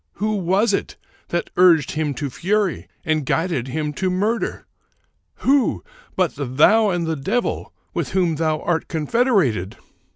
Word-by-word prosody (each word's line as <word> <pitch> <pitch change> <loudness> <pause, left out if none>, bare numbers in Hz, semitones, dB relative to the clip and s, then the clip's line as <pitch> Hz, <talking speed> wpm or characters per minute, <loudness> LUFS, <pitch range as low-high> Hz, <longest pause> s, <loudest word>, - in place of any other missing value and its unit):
Who 215 +2 -1
was 195 +4 +2
it - - -2 0.3
that 175 - -3
urged 170 -6 +5
him 155 -3 -2
to 140 -2 -4
fury 195 - -1 0.2
and 155 -1 +1
guided 160 -3 -1
him 150 +2 -3
to 185 +5 -1
murder? 210 +6 -1 0.8
Who, 275 0 +2 0.3
but 185 -3 +1
thou 150 - +3
and 175 -3 -1
the 160 0 -1
devil, 195 - -2 0.2
with - - -3
whom 175 -5 +1
thou 155 -1 0
art 165 -2 -1
confederated?" 160 - +1
170 Hz, 140 wpm, -21 LUFS, 150-200 Hz, 0.8 s, urged